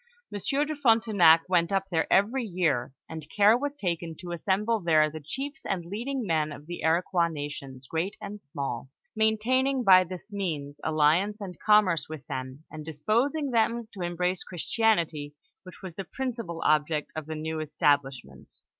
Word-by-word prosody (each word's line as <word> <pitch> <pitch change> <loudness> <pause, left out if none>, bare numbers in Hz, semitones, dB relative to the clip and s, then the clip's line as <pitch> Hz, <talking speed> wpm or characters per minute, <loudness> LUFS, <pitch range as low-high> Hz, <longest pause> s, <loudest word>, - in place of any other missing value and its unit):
Monsieur 275 +8 0
de 310 0 -4
Fron 240 -6 +4
tenac 180 -8 +5
went 175 -1 +2
up 195 -1 +1
there 160 -2 0
every 225 +7 +3
year, 165 - 0 0.2
and 160 -1 -8
care 210 +4 +5
was 285 +3 -2
taken 170 - -3
to 175 +2 -9
assem 190 +4 0
ble 230 0 +1
there 155 -4 +3
the 155 - -7
chiefs 275 - -6
and 180 -3 -2
leading 235 +7 -3
men 155 -4 0
of 145 0 -10
the 175 +2 -6
Iroquois 170 +2 +2
nations, 145 -4 -7
great 165 +8 -2
and 205 0 -8
small; 135 -3 -5 0.3
maintaining 250 +5 +2
by 185 -3 +7
this 180 +2 -9
means 150 -8 -4
alliance 160 +7 +2
and 190 -4 -8
commerce 195 -9 +3
with 155 -4 -8
them, 130 +3 -6
and 155 -1 -7
disposing 235 - 0
them 230 0 +1
to 195 - -8
embrace 175 +1 -1
Christi 185 +6 -5
anity, 165 -9 +2 0.3
which 185 +1 -14
was 185 -3 -7
the 195 - -5
principal 230 -7 -5
object 150 0 +1
of 155 -1 -5
the 160 - -4
new 160 +1 -3
establish 145 -3 +1
ment. - - -16
175 Hz, 175 wpm, -27 LUFS, 155-215 Hz, 0.3 s, by